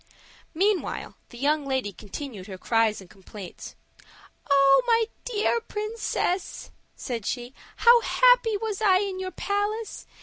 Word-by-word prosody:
Meantime 395 +3 0 0.2
the 240 - -12
young 295 +3 +1
lady 260 -7 -2
continued 210 0 -8
her 190 -2 -8
cries 225 +1 +1
and 190 - -13
complaints. 190 -1 -10 0.7
"Oh, 275 -1 +6
my 460 -1 +4 0.2
dear 465 0 0
princess," 425 -4 -3 0.2
said 235 -5 -5
she, 245 +3 -4 0.2
"how 475 0 +6
happy - - +4
was 430 -1 -4
I 385 -4 +5
in 385 -1 -2
your 375 0 -3
palace! 410 +3 -3
370 Hz, 130 wpm, -26 LUFS, -, 0.7 s, Oh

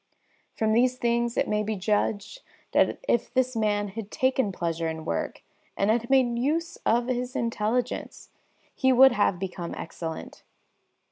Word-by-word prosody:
From 220 -1 +1
these 250 +2 +3
things 235 0 0
it - - +2
may 210 0 +1
be 215 +1 -2
judged 205 - -1 0.3
that - - +3
if 235 - +1
this 255 0 +1
man 205 -2 0
had 210 +1 -7
taken 260 -4 +1
pleasure 165 -2 -2
in 160 0 -5
work 85 - -3 0.3
and 200 +2 +2
had 235 +1 0
made 250 -3 +3
use 320 +6 -1
of 235 +1 +3
his 250 0 -3
intelligence, 230 +1 -2 0.4
he 260 -1 +2
would 265 +1 +7
have 205 -5 +2
become 180 -2 -5
excellent. 165 -1 -7
230 Hz, 150 wpm, -26 LUFS, 200-250 Hz, 0.4 s, would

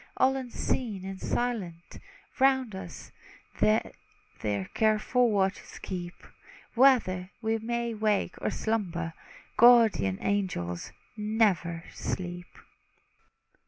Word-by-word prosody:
All 265 +1 +4
unseen 240 -5 -3
and 190 0 -7
silent, 195 -9 -3 0.4
round 265 -4 +3
us 180 -3 -9 0.5
They 105 +1 +2 0.5
their 100 -2 -1
careful 220 +3 +2
watches 195 -2 -1
keep; 175 -2 -6 0.6
Whether 230 -8 +4
we 225 -1 0
may 235 +1 -2
wake, 210 -3 0
or - - 0
slumber, 175 -7 -2 0.4
Guardian 225 - +6
angels 180 - -2 0.2
never 210 -6 +1
sleep! 175 -1 -4
205 Hz, 90 wpm, -28 LUFS, 175-235 Hz, 0.6 s, Guardian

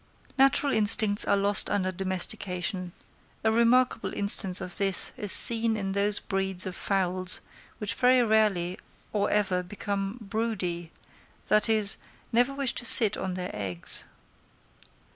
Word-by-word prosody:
Natural 275 +1 +1
instincts 215 -1 0
are 200 - 0
lost 200 0 +2
under 185 -2 -3
domestication: 185 -1 -3 0.5
a 220 - 0
remarkable 235 +1 0
instance 200 -2 0
of 180 -2 -8
this 195 -2 +1
is 205 -2 -2
seen 230 -1 +5
in 195 -2 -5
those 200 +1 -2
breeds 190 -1 -3
of 185 -1 -7
fowls 185 -2 -4 0.4
which 210 -1 -4
very 250 0 +1
rarely 210 -5 -1 0.3
or 205 -1 -2
never 190 -3 -1
become 195 +2 -6
"broody," 195 -6 -5 0.6
that 210 +1 +1
is, 215 -3 0 0.3
never 245 +3 +1
wish 275 -2 -3
to - - -4
sit 220 -3 +11
on 185 -1 -6
their 180 0 -7
eggs. 95 -4 -4
200 Hz, 135 wpm, -25 LUFS, 185-220 Hz, 0.6 s, sit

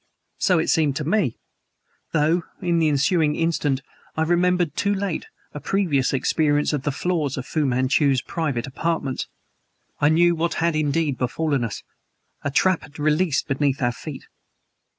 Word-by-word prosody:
So 185 - +3
it 160 - 0
seemed 150 -4 +2
to 150 - -2
me; 175 - +1 0.7
though, 160 +3 +2 0.2
in 170 -1 +1
the 160 - +3
ensuing 150 +2 +2
instant 155 -5 0 0.4
I 160 - +2
remembered, 175 -1 +2
too 200 +2 +1
late, 195 -4 -3 0.3
a 150 - -5
previous 150 -5 +1
experience 145 +2 +1
of 145 - -1
the 145 - -1
floors 150 -2 -1
of 130 - -4
Fu 150 -1 0
Manchu's 130 +2 +2
private 145 -8 -2
apartments; 140 -1 -2 0.7
I 145 - +4
knew 170 +2 +4
what 170 +1 -1
had 170 -1 +1
indeed 150 -2 0
befallen 140 +1 0
us. 115 - -4 0.6
A 145 - 0
trap 185 +5 +2
had 145 - -14
been 150 - -6
released 155 -1 +2
beneath 140 -1 0
our 120 - +2
feet. 135 +3 -8
155 Hz, 160 wpm, -23 LUFS, 140-170 Hz, 0.7 s, I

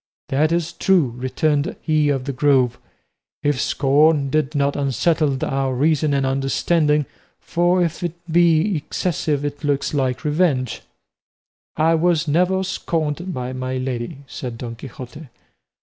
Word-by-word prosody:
"That 150 +4 +2
is 170 0 -1
true," 175 -13 +2
returned 145 +4 0
he 155 -2 +1
of 135 -3 0
the 140 - -3
Grove, 130 -3 +2 0.6
"if 145 -2 +1
scorn 145 0 +2
did 155 0 0
not 140 0 +1
unsettle 145 +1 +1
our 135 -1 -1
reason 150 +2 +2
and 135 -1 +1
understanding, 150 +3 +1 0.3
for 175 +1 +1
if 165 -1 -3
it 175 -2 -2
be 170 +3 +3
excessive 150 -1 -2
it 145 +1 -5
looks 140 -1 0
like 130 -3 -1
revenge." 150 -6 +1 1.0
"I 160 +2 +3
was 165 -1 +2
never 180 +5 +2
scorned 170 -2 -2
by 125 -4 -4
my 130 0 -3
lady," 130 +3 -4
said 125 -3 -7
Don 115 -1 -6
Quixote. 130 +4 -10
145 Hz, 135 wpm, -21 LUFS, 135-165 Hz, 1.0 s, be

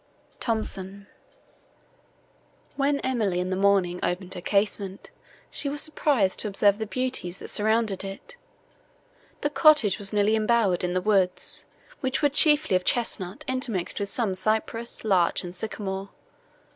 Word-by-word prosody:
THOMSON 200 -4 -3 1.7
When 280 0 +1
Emily, 215 -9 0
in 180 +1 -2
the - - 0
morning, 190 -2 +2
opened 180 +1 -2
her 180 - -7
casement, 200 0 -2 0.4
she 285 - 0
was 290 +1 -4
surprised 280 -10 +1
to - - 0
observe 205 +1 +2
the 220 - -3
beauties, 250 -7 -2
that - - -8
surrounded 215 -2 +1
it. 195 - -9 1.1
The 290 - -1
cottage 285 - +4
was 200 -1 -4
nearly 210 +1 +2
embowered 215 -5 +2
in 180 0 -1
the 185 - +1
woods, 190 -3 +1 0.3
which 260 +2 -2
were 290 - +5
chiefly 295 - +5
of 185 - +1
chesnut 195 -5 -1
intermixed 245 -10 -1
with 200 -1 -2
some 220 -5 0
cypress, 220 +4 -2
larch 185 -5 +2
and 175 -1 -7
sycamore. 195 0 -5
205 Hz, 140 wpm, -25 LUFS, 190-240 Hz, 1.7 s, were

